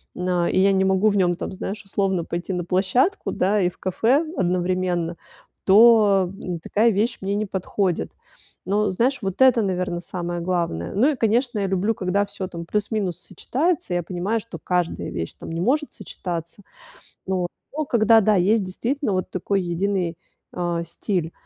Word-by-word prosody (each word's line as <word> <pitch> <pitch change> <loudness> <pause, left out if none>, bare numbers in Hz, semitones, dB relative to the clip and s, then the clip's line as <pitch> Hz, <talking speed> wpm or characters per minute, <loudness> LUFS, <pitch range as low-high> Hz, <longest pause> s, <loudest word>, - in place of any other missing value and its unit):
на 180 -1 0
и - - +2
я 195 +1 +5
не 190 0 +2
могу 190 +2 +3
в 205 - 0
нём 180 -2 +2
там, - - -5
знаешь, 195 +2 -5
условно 195 -3 0
пойти 175 +3 -4
на 180 - -2
площадку, 200 - +1
да, 200 +3 +1
и 180 - +2
в - - -18
кафе 235 - +1
одновременно, 180 -1 0 0.5
то, 200 -3 +6
м, 175 -2 -4
такая 215 +7 +2
вещь 225 +4 0
мне 195 +1 -1
не 215 +1 -1
подходит. 190 - -2 0.5
Но, 205 +2 +1
знаешь, 250 +8 +1
вот 195 +2 -3
это, 255 -3 +6
наверно, 180 -3 -1
самое 175 0 -4
главное. 170 - -2
Ну 250 +9 +4
и, 290 - -2
конечно, 235 0 +1
я 195 - 0
люблю, 195 +4 +1
когда 195 +2 0
всё 190 -2 -6
там 170 -2 -7
плюс-минус 205 -3 -1
сочетается, 300 - -2
я 175 - 0
понимаю, 185 +6 -2
что 230 - -9
каждая 180 -2 -1
вещь 85 -1 -4
там - - -7
не 165 - -3
может 290 - +1
сочетаться. 170 +2 -6 0.6
Вот, 185 -2 -1 0.3
но 310 - 0
когда, 225 -3 +5
да, 215 0 +3
есть 200 +4 +3
действительно 235 +6 -2
вот 185 0 -2
такой 195 +2 -1
единый, 175 0 -1 0.4
а, 175 -1 -2
стиль, 170 0 -3
190 Hz, 175 wpm, -23 LUFS, 175-215 Hz, 0.6 s, то